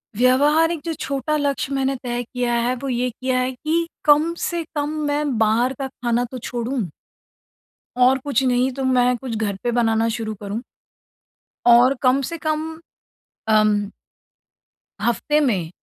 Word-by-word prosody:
व्यवहारिक 295 +7 +3
जो 330 - -2
छोटा 275 +2 -2
लक्ष्य 280 -1 -1
मैंने 270 0 0
तय 245 0 -2
किया 245 0 -2
है, 235 +2 +1
वो 270 +2 -5
ये 250 0 0
किया 255 +2 -1
है 255 +1 0
कि 320 +6 -1 0.2
कम 305 +3 +4
से 345 -1 -2
कम 295 0 -1 0.2
मैं 290 -3 0
बाहर 225 +4 +2
का 270 - -2
खाना 240 -2 -1
तो 260 - -5
छोड़ूँ। 240 -2 -3 1.1
और 255 +1 +5
कुछ 275 -3 +1
नहीं 255 0 +2
तो 270 +1 -4
मैं 250 -1 +3
कुछ 240 -1 -5
घर 210 -2 -1
पे 240 - 0
बनाना 225 -1 +2
शुरू 220 -2 -4
करूँ। 205 +3 -4 1.0
और 240 +2 +6
कम 260 +2 +4
से 335 +6 -4
कम, 315 +1 -3 0.7
अम 215 -2 +3 1.1
हफ्ते 240 +7 +1
में 200 - 0
255 Hz, 150 wpm, -21 LUFS, 235-285 Hz, 1.1 s, और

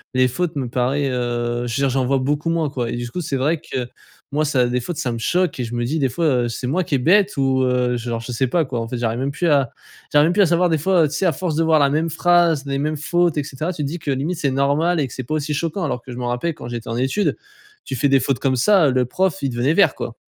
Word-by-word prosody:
les 130 0 +4
fautes 170 +3 -2
me 130 -4 -3
paraît, 130 +3 0
heu, 120 -1 -2
je 115 - -3
veux 140 - -1
dire, 135 - +3
j'en 130 0 0
vois 135 +1 +2
beaucoup 145 +5 -1
moins, 165 -3 0
quoi. 125 -4 -3
Et 120 - -3
du 120 0 -4
coup 180 - -3
c'est 145 -4 -3
vrai 150 +5 +1
que, 130 -6 -4 0.4
moi 150 +2 +1
ça 130 -4 +2
des 125 +1 0
fautes 160 +7 -5
ça 125 - -1
me 115 - -4
choque 175 +6 0
et - - 0
je 115 +1 -6
me 120 - -1
dis 155 +5 -1
des 135 - +1
fois: 165 +7 -2 0.2
«Heu - - -1
c'est 115 - -5
moi 165 +9 0
qui 145 - 0
est - - +3
bête», 190 +9 +3
ou 135 -1 +2
heu 125 -1 +1
genre 120 -1 -3
je 120 +2 -7
sais 130 +3 0
pas 165 +7 +1
quoi, 125 -3 -3
en 115 - -4
fait. 125 - -4
J'arrive 115 0 -1
même 135 +2 -1
plus 170 +4 -1
à 140 -4 +3 0.4
j'arrive 145 +1 +5
même 170 - +1
plus 205 - +3
à - - +6
savoir 175 +2 +2
des 160 - +2
fois 180 +1 +3
heu, - - +3
tu - - -7
sais, 190 - 0
à 165 - +2
force 165 +1 -3
de 165 - +2
voir 160 -1 +4
la 140 - +4
même 160 +2 0
phrase, 170 -2 +2
les 140 -1 -2
mêmes 155 +1 -1
fautes 170 +2 +1
et 145 - +1
cetera, 155 +6 -4
tu 150 - -4
te 140 - -1
dis 170 +4 -5
que 145 - -6
limite 145 +6 -1
c'est 140 - +1
normal 145 +6 +1
et 140 - 0
que - - -11
c'est 130 - -5
pas 120 - -5
aussi 150 0 -2
choquant! 165 +5 -2
Alors 135 -6 -2
que 125 - -11
je 120 - -8
m'en 125 - -3
rappelle 125 +8 -1
quand - - -9
j'étais 120 -2 -6
en 115 - -2
études, 135 +11 0 0.5
tu - - -5
fais 135 +3 +2
des 135 0 +5
fautes 135 -3 0
comme 130 -1 +1
ça, 175 - +4
heu, - - +2
le 125 -1 +1
prof, 185 +6 0
il 135 - +1
devenait 125 +6 +1
vert 175 -6 +4
quoi! 115 - -6
140 Hz, 320 wpm, -20 LUFS, 125-165 Hz, 0.5 s, à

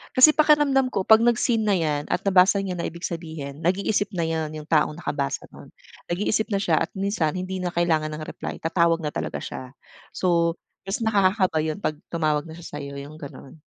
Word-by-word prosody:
Kasi 305 +4 +8
pakiramdam 295 -4 +4
ko 190 - -2
pag 220 +1 +7
nag-seen 235 -1 +2
na 210 - +2
yan 155 -6 0
at - - +1
nabasa 190 +1 +5
niya 190 -2 -3
na 170 - -4
ibig 170 +1 -4
sabihin 160 -4 -7
nag-iisip 200 +3 +1
na 170 -4 -1
yan 160 -1 -2
yung 155 -1 -8
taong 155 -2 +3
nakabasa 145 - -3
nun. - - -13 0.4
Nag-iisip 210 +4 0
na 200 - +1
siya 170 -6 +2
at 165 - -6
minsan 195 -6 0
hindi 185 +1 -4
na 175 - -1
kailangan 160 -3 +1
ng 155 0 -6
reply - - -6
tatawag 165 0 +2
na 155 - -3
talaga - - -3
siya. - - -6 0.5
So 170 -2 +1 0.3
mas 195 +1 -3
nakakakaba 200 -5 +2
yun 155 +3 -3
'pag 155 - -2 0.2
tumawag 155 -3 0
na 160 +1 -11
siya 170 - -11
sayo 140 0 -6
yung 145 +2 -9
ganun. 145 -1 -11
175 Hz, 195 wpm, -24 LUFS, 155-200 Hz, 0.5 s, Kasi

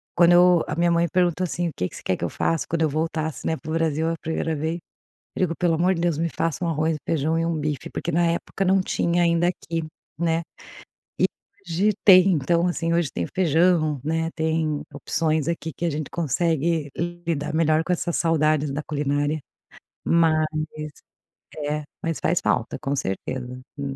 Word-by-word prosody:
quando 175 0 +6
eu 180 -1 +6
a 150 - -3
minha 170 +1 +2
mãe 170 0 +3
perguntou, 180 0 +2
assim: 175 0 -2
"O - - -7
que 90 - -1
que - - -13
você - - -10
quer - - 0
que - - -6
eu - - -2
faça 165 -1 0
quando 165 -1 -1
eu 155 - +3
voltasse, 155 +1 -2
né, 160 - +1
para 155 0 -7
o - - -1
Brasil, 160 0 +1
a 165 - -1
primeira 160 0 -2
vez", 160 +3 -2 0.6
eu 185 - +2
disse: 165 - -4
"Pelo 175 -2 +2
amor 180 +4 +2
de 165 - -3
Deus, 170 -3 +1
me 165 +2 0
faça 165 +2 -2
um - - 0
arroz, 160 0 0
feijão 160 +1 +1
e 165 - 0
um 170 - 0
bife", 150 -3 -3
porque 170 - -3
na 170 +2 +2
época 170 +3 -1
não 190 +1 +4
tinha 175 -1 0
ainda 170 0 +3
aqui, 165 -2 -3 0.4
né. 165 -1 +1 0.8
E - - +3 0.4
hoje 185 +6 +2
tem. 185 -1 +8
Então, 170 +3 +2
assim, 170 -1 -1
hoje 170 -5 +1
tem 85 - -2
feijão, 165 -4 +3
né. 165 +1 0
Tem 160 -2 0
opções 155 +1 0
aqui 165 -1 -3
que 175 - -4
a 170 - +2
gente 150 -1 -4
consegue 165 0 0 0.4
lidar 150 -2 -1
melhor 160 0 +3
com 180 - 0
essas 175 -1 -1
saudades 155 -3 +2
da 145 +2 -3
culinária, 145 +1 -1 0.7
mas, 160 -2 +3 1.1
é, 150 +1 -2 0.2
mas 165 -1 -2
faz 175 - +1
falta, 120 - 0
com 140 - -2
certeza. 125 +4 -4 0.2
Hum 135 -1 -3
165 Hz, 195 wpm, -24 LUFS, 150-170 Hz, 1.1 s, tem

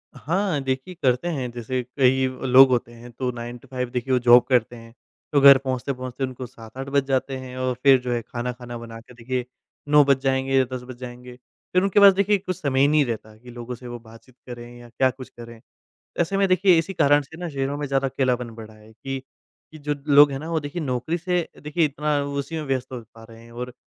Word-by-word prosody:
हाँ, 175 0 -1
देखिए 135 +6 -3
करते 125 +5 +2
हैं 130 -5 -3
जैसे 125 +2 -3 0.2
कई 130 0 +3 0.2
लोग 130 +1 +8
होते 120 -2 0
हैं 120 +1 -13
तो 125 +2 -3
9 120 0 -7
टू 130 - -19
5 125 -1 -3
देखिए 125 +1 -2
वो - - +4
जॉब 120 0 +7
करते 120 -1 +2
हैं, 115 -1 -13 0.4
तो 140 - +4
घर 140 -1 +9
पहुँचते-पहुँचते 130 0 -4
उनको 130 -1 -4
7-8 125 +2 -10
बज 140 0 +2
जाते 135 0 -1
हैं 130 -1 -9
और 130 0 -1
फिर 135 -2 +6
जो 125 - -4
है 120 - -1
खाना-खाना 120 +1 -6
बना 115 -1 -9
के 125 - -17
देखिए 125 +1 -4 0.4
9 150 0 +7
बज 140 -1 +4
जाएँगे 135 0 +1
या 130 - +4
10 125 - -6
बज 125 0 -10
जाएँगे। 125 0 -9 0.4
फिर 180 - +4
उनके 195 +1 +3
पास 200 -1 +8
देखिए 200 +1 +2
कुछ 185 -1 -5
समय 135 -2 0
ही 140 - +5
नहीं 150 -1 +3
रहता 110 -2 -6
कि, 125 +2 -15
लोगों 120 +1 -7
से 125 +1 -12
वो 120 0 -7
बातचीत 115 +2 -17
करें 120 0 -9
या 120 - -13
क्या 130 +2 +2
कुछ 130 0 -11
करें। 115 -1 -12 0.6
ऐसे 175 +3 0
में 195 - +3
देखिए 185 -1 +4
इसी 190 +4 -4
कारण 145 -2 +4
से 160 +4 -13
ना 175 -1 -5
शहरों 140 0 -3
में 145 - -3
ज़्यादा 135 0 0
अकेलापन 125 -2 -1
बढ़ा 110 -1 -11
है 110 0 -18
कि, 135 +4 -6 0.5
कि 155 - -11
जो 145 0 -3
लोग 145 0 +7
है 135 - -3
ना 160 +3 -7
वो 160 - +1
देखिए 145 +4 -5
नौकरी 130 +4 -2
से 175 0 -1 0.2
देखिए 155 +2 +1
इतना 150 +1 -1
उसी 140 +3 -4
में 155 - -3
व्यस्त 130 -2 -2
हो 125 -2 -6
पा 115 - -13
रहे 115 0 -14
हैं 115 - -16
और 125 +1 -7
130 Hz, 235 wpm, -23 LUFS, 120-145 Hz, 0.6 s, घर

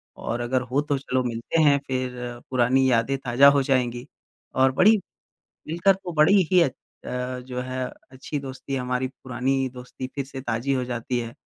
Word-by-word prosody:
और 120 - -3
अगर 125 +2 0
हो 140 +3 +2
तो 145 - +2
चलो 130 -1 -1
मिलते 120 +6 -1
हैं, 145 -2 +5
फ़िर 125 -2 -4
पुरानी 130 +1 +3
यादें 125 +3 +2
ताज़ा 130 +1 +5
हो - - +4
जाएँगी।", 125 -1 0 0.5
और 130 0 +4
बड़ी 210 +11 +5 0.7
मिलकर 170 +5 +3
तो 185 -2 -7
बड़ी 160 +6 +5
ही 180 - +6
अत 135 -6 +1 0.3
अ, 125 0 -3
जो 125 0 -5
है 130 0 -3 0.3
अच्छी 135 +3 -5
दोस्ती 135 0 -6
हमारी 125 0 -1
पुरानी 130 0 -3 0.2
दोस्ती 125 +1 -7
फ़िर 140 - -2
से 135 -1 -8
ताज़ी 120 +2 -1
हो 130 - 0
जाती 120 0 -2
है। 115 -1 -5
130 Hz, 180 wpm, -24 LUFS, 125-135 Hz, 0.7 s, ही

